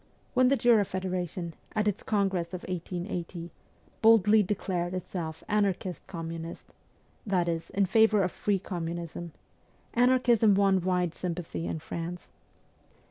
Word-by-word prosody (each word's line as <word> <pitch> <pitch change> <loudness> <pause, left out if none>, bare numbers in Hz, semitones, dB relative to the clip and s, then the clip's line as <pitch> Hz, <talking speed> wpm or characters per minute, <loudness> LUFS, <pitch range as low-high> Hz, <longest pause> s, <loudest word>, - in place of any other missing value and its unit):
When 255 0 +5
the 275 - +4
Jura 235 -4 +5
Federation, 180 -3 -3 0.2
at 215 -1 +1
its 205 0 0
congress 190 -4 0
of 180 - -7
1880, 175 -1 -4 0.5
boldly 220 -1 +6
declared 185 -3 -2
itself 170 -3 -5
anarchist 195 -3 -1
communist 165 -1 -6 0.6
that 185 -4 +1
is, 165 -1 -2
in 200 0 +2
favour 215 +1 +4
of 180 - 0
free 205 -1 0
communism 170 -2 -5 0.6
anarchism 240 -4 +4
won 195 -1 +3
wide 180 -2 0
sympathy 170 -2 -4
in - - -2
France. 170 +3 -6
185 Hz, 125 wpm, -29 LUFS, 170-205 Hz, 0.6 s, boldly